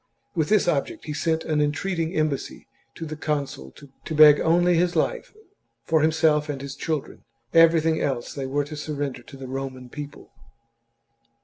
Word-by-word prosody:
With 160 Hz, -5 st, 0 dB
this 210 Hz, -3 st, +3 dB
object 150 Hz, -5 st, -1 dB
XLVI -, -, -13 dB
he 150 Hz, -, -4 dB
sent 160 Hz, +1 st, -1 dB
an 155 Hz, -2 st, +1 dB
entreating 165 Hz, +3 st, -1 dB
embassy 155 Hz, -3 st, -2 dB, 0.3 s
to 165 Hz, -, -6 dB
the 155 Hz, 0 st, -6 dB
consul 145 Hz, -, -3 dB
to 145 Hz, +3 st, -9 dB
beg 150 Hz, -1 st, +8 dB
only 175 Hz, +1 st, +3 dB
life -, -, -2 dB, 0.5 s
for 160 Hz, -1 st, +2 dB
himself 155 Hz, -1 st, +2 dB
and 140 Hz, -2 st, -3 dB
his 140 Hz, 0 st, -6 dB
children; 155 Hz, 0 st, -4 dB, 0.3 s
everything 165 Hz, -1 st, +4 dB
else 130 Hz, -4 st, -2 dB
they 135 Hz, -2 st, -4 dB
were 145 Hz, +2 st, 0 dB
to 150 Hz, +1 st, -8 dB
surrender 145 Hz, -4 st, -4 dB
to 135 Hz, +3 st, -13 dB
the 135 Hz, -1 st, -8 dB
Roman 130 Hz, -1 st, -6 dB
people. 145 Hz, +2 st, -9 dB
150 Hz, 165 wpm, -24 LUFS, 140-160 Hz, 0.5 s, beg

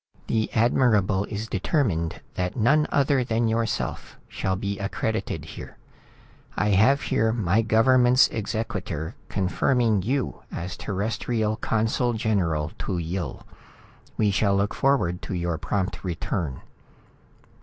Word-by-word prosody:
"The 110 Hz, -1 st, 0 dB
Admirable 110 Hz, -4 st, +3 dB
is 105 Hz, +1 st, -5 dB
determined 95 Hz, -, 0 dB
than 90 Hz, 0 st, -2 dB
none 145 Hz, +6 st, +3 dB
other 140 Hz, -2 st, +3 dB
than 115 Hz, -1 st, 0 dB
yourself 115 Hz, 0 st, -2 dB
shall 95 Hz, -, -2 dB
be 100 Hz, +1 st, -3 dB
accredited 100 Hz, +1 st, -2 dB
here. -, -, -10 dB, 0.8 s
I 105 Hz, -, +2 dB
have 110 Hz, +9 st, +4 dB
here 110 Hz, 0 st, +1 dB
my 110 Hz, -2 st, +2 dB
government's 125 Hz, +3 st, +5 dB
exequatur 105 Hz, -8 st, -3 dB, 0.2 s
confirming 110 Hz, +3 st, +1 dB
you 130 Hz, +6 st, -2 dB
as 90 Hz, +2 st, -5 dB
Terrestrial 110 Hz, +2 st, -1 dB
consul 115 Hz, +3 st, 0 dB
general 85 Hz, -9 st, 0 dB
to 95 Hz, -, -2 dB
Yill. 85 Hz, -4 st, -4 dB, 0.7 s
We 105 Hz, -2 st, +3 dB
shall 100 Hz, 0 st, +2 dB
look 100 Hz, +1 st, +1 dB
forward 110 Hz, -11 st, +1 dB
to 95 Hz, -, -4 dB
your 85 Hz, -2 st, -2 dB
prompt 95 Hz, +3 st, -2 dB
return." 85 Hz, -5 st, -3 dB
105 Hz, 120 wpm, -25 LUFS, 95-115 Hz, 0.8 s, government's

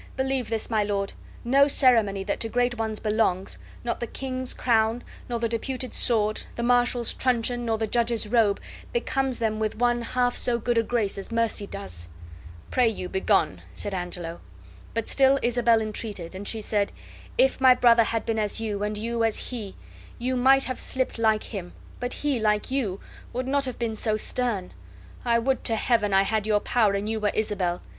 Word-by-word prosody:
Believe 265 Hz, -2 st, -1 dB
this, 225 Hz, -1 st, -1 dB
my 220 Hz, -2 st, +1 dB
lord, 200 Hz, -1 st, -2 dB, 0.3 s
no 275 Hz, +4 st, +5 dB
ceremony 225 Hz, -8 st, +3 dB
that 200 Hz, +1 st, -2 dB
to 225 Hz, -, -2 dB
great 245 Hz, 0 st, 0 dB
ones 220 Hz, -1 st, -2 dB
belongs, 210 Hz, -4 st, 0 dB, 0.2 s
not 240 Hz, -, -2 dB
the 235 Hz, -, -3 dB
king's 255 Hz, +1 st, -3 dB
crown, 225 Hz, 0 st, +1 dB, 0.3 s
nor 240 Hz, -, -1 dB
the 230 Hz, 0 st, 0 dB
deputed 255 Hz, +3 st, -3 dB
sword, 215 Hz, -3 st, +2 dB
the 235 Hz, -, -3 dB
marshal's 245 Hz, -1 st, +3 dB
truncheon, 245 Hz, -1 st, 0 dB
nor 225 Hz, -1 st, 0 dB
the 220 Hz, -, -1 dB
judge's 230 Hz, 0 st, +1 dB
robe, 215 Hz, -3 st, +3 dB, 0.3 s
becomes 270 Hz, -, -1 dB
them 220 Hz, -1 st, -1 dB
with 215 Hz, -1 st, -2 dB
one 240 Hz, 0 st, +2 dB
half 245 Hz, +1 st, 0 dB
so 245 Hz, -1 st, +2 dB
good 235 Hz, 0 st, +1 dB
a -, -, +4 dB
grace 220 Hz, -3 st, -1 dB
as 195 Hz, -, -7 dB
mercy 230 Hz, -3 st, 0 dB
does." 85 Hz, -, -4 dB, 0.6 s
"Pray 250 Hz, -2 st, +4 dB
you 185 Hz, -4 st, -5 dB
begone," 190 Hz, -, +1 dB
said 200 Hz, -, -2 dB
Angelo. 175 Hz, -2 st, -5 dB, 0.5 s
But 230 Hz, -1 st, -1 dB
still 270 Hz, 0 st, +4 dB
Isabel 235 Hz, -1 st, +3 dB
entreated; 210 Hz, -5 st, -4 dB
and 195 Hz, +2 st, -7 dB
she 225 Hz, -, -2 dB
said: 205 Hz, -1 st, 0 dB, 0.5 s
"If -, -, +3 dB
my 260 Hz, -1 st, +7 dB
brother 235 Hz, -2 st, +5 dB
had 225 Hz, 0 st, -2 dB
been 225 Hz, -1 st, -1 dB
as 210 Hz, +1 st, -1 dB
you, 210 Hz, -3 st, -3 dB
and 210 Hz, 0 st, -2 dB
you 230 Hz, +2 st, -1 dB
as 225 Hz, -1 st, 0 dB
he, 215 Hz, -6 st, -6 dB, 0.4 s
you 255 Hz, +2 st, -1 dB
might 270 Hz, +2 st, +5 dB
have 255 Hz, -, -4 dB
slipped 260 Hz, -2 st, -2 dB
like 220 Hz, -1 st, +2 dB
him, 185 Hz, -5 st, -7 dB, 0.3 s
but 245 Hz, +1 st, -3 dB
he, 285 Hz, -4 st, -1 dB
like 210 Hz, +1 st, +1 dB
you, 215 Hz, -9 st, -1 dB, 0.3 s
would 255 Hz, +1 st, -3 dB
not 280 Hz, +1 st, +1 dB
have 255 Hz, -, -5 dB
been 230 Hz, -2 st, -2 dB
so 215 Hz, 0 st, 0 dB
stern. 215 Hz, -4 st, -1 dB, 0.5 s
I 235 Hz, -1 st, +3 dB
would 260 Hz, +3 st, 0 dB
to 225 Hz, -, +2 dB
Heaven 220 Hz, -2 st, +1 dB
I 195 Hz, 0 st, +5 dB
had 215 Hz, +1 st, -1 dB
your 210 Hz, -1 st, +3 dB
power 215 Hz, -2 st, +2 dB
and 200 Hz, +1 st, -2 dB
you 220 Hz, 0 st, -1 dB
were 210 Hz, -1 st, +1 dB
Isabel. 195 Hz, -5 st, -1 dB
225 Hz, 190 wpm, -25 LUFS, 210-245 Hz, 0.6 s, my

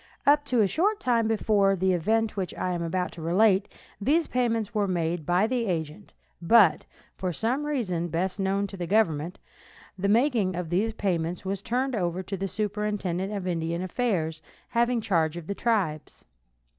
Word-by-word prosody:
Up 290 Hz, +1 st, +5 dB
to 245 Hz, -4 st, +2 dB
a 205 Hz, -, +4 dB
short 405 Hz, -, +1 dB
time 235 Hz, -, +1 dB
before 210 Hz, -3 st, +2 dB
the 190 Hz, 0 st, +1 dB
event 220 Hz, +6 st, +1 dB
which 190 Hz, -3 st, -3 dB
I 185 Hz, -, -2 dB
am 175 Hz, -, -3 dB
about 180 Hz, +2 st, -1 dB
to 170 Hz, -, -10 dB
relate 190 Hz, +4 st, +3 dB, 0.3 s
these 310 Hz, +9 st, +2 dB
payments 230 Hz, -4 st, -1 dB
were 210 Hz, -2 st, +1 dB
made 170 Hz, -3 st, -2 dB
by 180 Hz, +4 st, +3 dB
the 240 Hz, -1 st, -1 dB
agent, 160 Hz, -, -4 dB, 0.3 s
but, 185 Hz, -2 st, +5 dB, 0.3 s
for 185 Hz, -1 st, -2 dB
some 250 Hz, -, -1 dB
reason 185 Hz, -, -1 dB
best 180 Hz, +4 st, -2 dB
known 195 Hz, +1 st, 0 dB
to 195 Hz, -1 st, -8 dB
the 175 Hz, -2 st, -4 dB
government, 175 Hz, -5 st, +1 dB, 0.6 s
the 200 Hz, +2 st, 0 dB
making 225 Hz, -5 st, +2 dB
of 175 Hz, -2 st, -4 dB
the 205 Hz, +6 st, +1 dB
payment 175 Hz, -3 st, -2 dB
was 195 Hz, 0 st, -2 dB
turned 250 Hz, +4 st, -1 dB
over 180 Hz, -2 st, -1 dB
to 195 Hz, -, -4 dB
the 195 Hz, +1 st, -3 dB
superintendent 200 Hz, -1 st, -2 dB
of 200 Hz, -3 st, -4 dB
Indian 170 Hz, 0 st, -2 dB
affairs 180 Hz, -7 st, -1 dB, 0.3 s
having 235 Hz, 0 st, +1 dB
charge 170 Hz, -6 st, +1 dB
of 170 Hz, -, -7 dB
the 200 Hz, -, -3 dB
tribes. 195 Hz, -9 st, -2 dB
195 Hz, 175 wpm, -27 LUFS, 175-225 Hz, 0.6 s, Up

